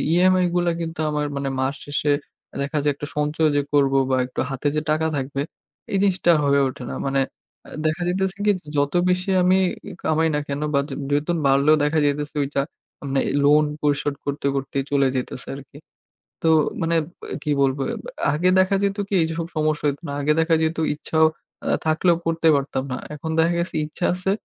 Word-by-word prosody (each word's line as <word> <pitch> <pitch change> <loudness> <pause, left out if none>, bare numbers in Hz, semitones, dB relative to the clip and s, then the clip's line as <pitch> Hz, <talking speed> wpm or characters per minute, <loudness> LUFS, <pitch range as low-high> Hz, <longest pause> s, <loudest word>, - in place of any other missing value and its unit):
EMI 185 +1 +4
গুলা 175 -1 +2
কিন্তু 165 -1 -5
আমার 150 0 -1
মানে 140 0 -2
মাস 135 +2 0
শেষে 145 0 0 0.5
দেখা 140 +2 -2
যায় 145 - +3
একটা 145 - -6
সঞ্চয় 150 +1 +1
যে 145 - +3
করব 140 -2 +3 0.2
বা 130 - +3
একটু 125 - -7
হাতে 135 +1 -2
যে 150 - +1
টাকা 160 +1 +1
থাকবে 140 0 -2 0.5
এই 195 - +1
জিনিসটা 190 -3 +2
আর - - +2
হয়ে 140 0 +4
ওঠে 130 - -9
না। - - -4
মানে 135 0 +1 0.5
আ - - -12 0.2
দেখা 155 +3 0
যাইতেছে 190 +2 -1
কি 210 - +5 0.3
যত 145 0 +1 0.2
বেশি 180 +1 0
আমি 185 +1 +4 0.4
কামাই 160 +1 +2
না - - +1
কেন 140 +1 -3
বা 140 - +4 0.3
বেতন 150 +4 +1
বাড়লেও 140 +3 +5
দেখা 150 +2 +2
যাইতেছে 145 +1 -1
ওইটা 140 0 -1 0.5
মানে 135 - +1 0.2
লোন 150 +2 +6 0.2
পরিশোধ 145 -1 0
করতে, 140 0 -3
করতেই 135 0 -2
চলে 140 -1 +3
যাইতেছে 130 0 -4
আরকি। 140 0 -12 0.6
তো 165 - +2 0.3
মানে 165 0 +1 0.5
কি 150 - -1
বলব 135 0 +2 0.6
আগে 175 +5 +2
দেখা 190 +1 +3
যেত 200 0 0
কি 200 - -6
এই - - +3
যেসব 165 0 -3
সমস্যা 155 -1 0
হইত 140 0 -1
না। - - -4
আগে 150 +2 +3
দেখা 165 0 +3
যেত 160 +1 0 0.2
ইচ্ছা 155 +1 -4 0.5
আ - - -3 0.2
থাকলেও 165 +2 +3
করতে 165 0 +1
পারতাম 135 -1 -1
না। 130 - -2 0.2
এখন 160 +2 -6
দেখা 165 +1 +3
গেছে 170 - -3
ইচ্ছা 155 +3 -4
আছে 185 +2 -1
150 Hz, 190 wpm, -22 LUFS, 140-165 Hz, 0.6 s, লোন